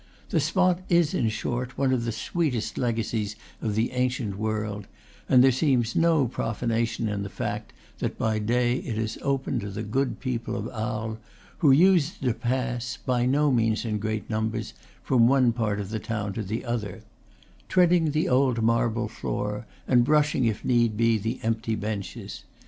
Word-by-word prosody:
The - - +2
spot 180 +4 +2
is, 170 -4 +3
in 115 - +1
short, 120 +4 -3
one 135 -1 +2
of 120 -2 0
the 115 - -1
sweetest 115 -2 -2
legacies 115 -3 -1 0.3
of 105 -2 -1
the 110 +2 +1
ancient 125 -5 -1
world; 105 -1 -3 0.4
and 125 -1 +7
there 135 - +6
seems 125 -4 +1
no 165 -5 +3
profanation 115 -1 -1
in 105 -1 -2
the 100 - -4
fact - - -4 0.3
that - - -2
by 110 -1 0
day 120 +3 +1
it 115 -4 -4
is 110 -1 -3
open 135 -1 -1
to 100 - -5
the 100 +2 -5
good 130 +6 -1
people 120 -3 -3
of 110 -2 -3
Arles, 110 -1 -3 0.4
who 155 - +4
use 170 +2 +5
it - - -6
to 125 - +3
pass, 125 -1 -2
by 125 -1 +1
no 145 +2 +3
means 115 -2 +1
in 105 -2 -1
great 110 0 -3
num 110 0 0
bers, 110 -1 -5 0.3
from 120 -3 +4
one 130 -2 +4
part 110 -3 -1
of 100 0 -5
the 110 - -2
town 105 -2 -3
to 110 - -3
the 110 +5 -4
other; 110 -2 -4 0.7
treading 175 -3 +4
the 155 +2 0
old 125 -3 +2
marble 115 0 +1
floor, 105 -1 -4 0.2
and 125 -2 +5
brushing, 150 -1 +2
if 110 -2 -1
need 120 -3 +2
be, 115 -1 +3
the 115 +5 -3
empty 115 0 -1
benches. 105 -2 -5
115 Hz, 180 wpm, -26 LUFS, 110-130 Hz, 0.7 s, and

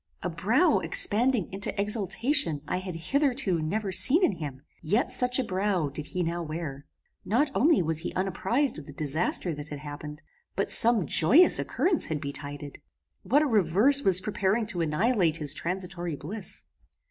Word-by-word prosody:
A - - -4
brow - - 0
expanding 235 -1 +1
into 195 0 -2
exultation 210 - 0
I - - -3
had 185 -2 -7
hitherto 240 - -1
never 195 +5 -4
seen 295 - +7
in - - +2
him, 140 -4 -9 0.2
yet 205 +10 -1
such 250 0 +1
a 260 - -1
brow 190 - -2
did 145 +2 -7
he 180 - -4
now 170 +1 -4
wear. 155 -4 -8 0.4
Not 270 +8 -1
only 305 - +1
was 160 -1 +2
he 170 - -3
unapprized 195 - -2
of 140 - -14
the 145 - -11
disaster 155 +4 -1
that 145 0 -9
had 150 - -8
happened, 150 +1 -10 0.3
but - - -2
some 225 -6 +6
joyous 235 - +7
occurrence 360 -3 -1
had 155 -2 -4
betided. 145 0 -8 0.4
What 290 +3 +1
a - - -1
reverse 220 - +2
was 185 -7 +3
preparing 205 +2 -2
to 175 - -4
annihilate 170 +1 0
his 145 -3 -2
transitory 175 -1 -4
bliss! 185 +10 -6
185 Hz, 165 wpm, -25 LUFS, 155-230 Hz, 0.4 s, seen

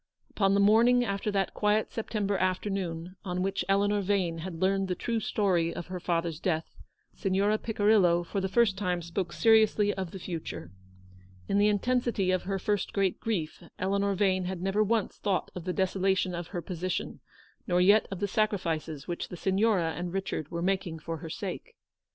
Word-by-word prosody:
Upon 195 -1 +2
the - - +3
morning 235 +4 +5
after 200 0 -2
that 195 -2 0
quiet 210 +1 +1
September 210 -3 -2
afternoon 185 -2 -2
on 180 -2 -2
which 195 -1 -1
Eleanor 205 +1 +2
Vane 185 -4 0
had 165 0 -6
learned 195 +1 +1
the 180 - -1
true 230 +5 -1
story 185 -6 +1
of 170 - -6
her 180 - -3
father's 165 -2 -1
death, 160 -3 -2 0.4
Signora 200 +3 +1
Picirillo 205 -6 +3
for 195 +3 -2
the 190 - -1
first 200 -2 +2
time 180 -3 -1
spoke 170 +2 -3
seriously 220 -2 +4
of 190 -2 -4
the 190 - -8
future. 165 - -6 0.8
In 200 - +2
the 205 - +5
intensity 210 -2 +1
of 185 - 0
her 195 0 -1
first 205 +1 -1
great 195 -2 +1
grief, 180 -9 -3 0.2
Eleanor 200 +1 0
Vane 185 -1 +1
had 185 -1 -3
never 195 +4 +1
once 220 0 0
thought 195 -3 -1
of 180 -2 -7
the 185 - -1
desolation 190 -1 +1
of 170 -1 -4
her 175 -2 -5
position, 185 +1 -3 0.5
nor 180 -1 +2
yet 200 +4 +5
of 195 -3 -5
the 205 - 0
sacrifices 170 - -1
which 175 - -3
the 180 - -7
Signora 190 -2 +2
and 175 +2 -4
Richard 190 -6 -3
were 170 0 -3
making 185 -3 -1
for 165 +1 -5
her 160 +1 -8
sake. 205 - -6
190 Hz, 180 wpm, -29 LUFS, 175-205 Hz, 0.8 s, morning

